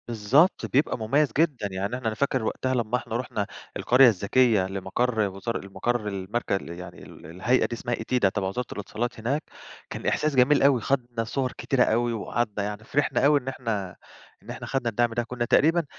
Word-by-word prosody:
بالضبط، 120 - +3
بيبقى 140 +4 +1
مُميَّز 135 +6 +2
جدًا، 145 -10 +1
يعني 100 +5 -3
إحنا 125 -3 -4
أنا 110 - 0
فاكر 130 -1 0
وقتها 130 +3 -1
لمّا 120 -1 0
إحنا 120 -3 -6
رُحنا 110 -5 -3 0.3
القرية 125 +2 +6
الذكية 110 -1 +3
لمقَر 100 +5 -2
وزار 100 +2 -4
لمقَر 115 +3 -2
المرك 100 +4 -3
يعني 90 -2 -4
ال - - -13
الهيئة 95 +11 +1
دي - - -4
اسمها 120 +1 -2
ETIDA 115 -2 +1
تبَع 95 -2 -1
وزارة 125 +6 -3
الإتصالات 110 +4 -4
هناك، 135 +8 -1 0.5
كان - - -7
إحساس 155 -2 +1
جميل 130 +3 +4
أوي، 135 -4 +4
خَدنا 120 -2 -1
صُوَر 130 +3 -2
كتيرة 130 -2 +2
أوي 120 +2 +1
وقعَدنا 110 -1 -2
يعني، 105 +1 -5
فرِحنا 135 +1 +1
أوي 145 0 +5
إن 130 - -17
إحنا، 110 -8 -3 0.5
إن - - -15
إحنا - - -6
خَدنا 135 -3 -1
الدعم 120 +1 0
ده، 120 +1 0
كنّا 120 0 -3
تقريبًا 165 +6 +3
120 Hz, 185 wpm, -26 LUFS, 105-130 Hz, 0.5 s, القرية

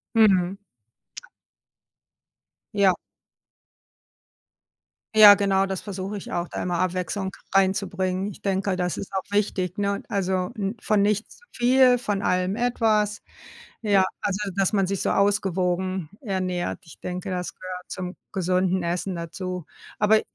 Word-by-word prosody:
Mhm. 195 -4 +4 2.2
Ja. 195 -3 +4 2.2
Ja, 210 -2 +10
genau, 195 -1 +2
das 190 -1 -4
versuche 195 0 -5
ich 195 - -8
auch, 175 0 -1
da - - -4
immer 175 -1 -1
Abwechslung 185 +1 -1 0.2
reinzubringen. 190 -1 +1
Ich - - -14
denke, 195 -1 0
das 180 -1 -1
ist 195 - -7
auch 190 -1 -1
wichtig, 195 -2 0
ne? 200 0 -1
Also, 185 -2 0
n 200 +1 -2
von 210 -2 +2
nichts 210 +1 0
zu 485 - -23
viel, 250 +1 +5
von 205 -5 -2
allem 185 +1 +1
etwas. 220 -4 +1 0.6
Ja, 200 -3 +4 0.2
also, 200 -2 -1 0.2
dass 195 0 +2
man 195 -3 +2
sich 195 0 -2
so - - +1
ausgewogen 185 -3 +1
ernährt. 185 -6 -2
Ich 160 - -15
denke, 180 +1 -5
das 180 -1 -3
gehört 185 -1 -8
zum 180 -1 -5 0.2
gesunden 185 0 +1
Essen 175 +2 -2
dazu. 180 +1 -5 0.3
Aber 215 +1 +5
190 Hz, 135 wpm, -25 LUFS, 185-205 Hz, 2.2 s, Ja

